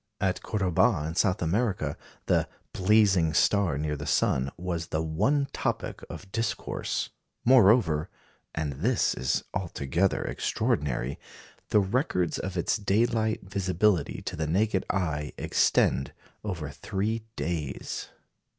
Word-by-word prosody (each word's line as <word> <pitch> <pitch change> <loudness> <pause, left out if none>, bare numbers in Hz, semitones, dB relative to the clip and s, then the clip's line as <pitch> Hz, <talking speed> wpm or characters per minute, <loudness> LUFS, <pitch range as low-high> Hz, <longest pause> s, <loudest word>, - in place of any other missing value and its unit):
At 95 -2 0
Cordoba, 95 -2 +2
in 80 - -4
South 95 +1 +1
America, 100 +4 0 0.3
the - - +2 0.2
"blazing 95 -5 +4
star 100 -8 +3
near 75 0 -1
the 75 0 -6
sun" 65 +1 +2
was 85 -2 -3
the 80 +1 -1
one 110 - +1
topic - - -2
of 95 - -9
discourse. 115 0 -2 0.3
Moreover 105 -10 +5 0.5
and 75 -3 -2
this 105 - +1
is 65 - 0
altogether 85 -1 0
extraordinary 70 -2 -1 0.5
the 105 - +5
records 95 - 0
of 95 -1 -4
its 85 - +1
daylight 110 +2 +1
visibility 95 -2 0
to - - -4
the 80 -1 -2
naked 95 +3 +1
eye 75 -7 -1
extend 65 - +2 0.3
over 85 -8 -4
three 105 +9 -2
days. 80 -5 -3
90 Hz, 120 wpm, -28 LUFS, 80-105 Hz, 0.5 s, Moreover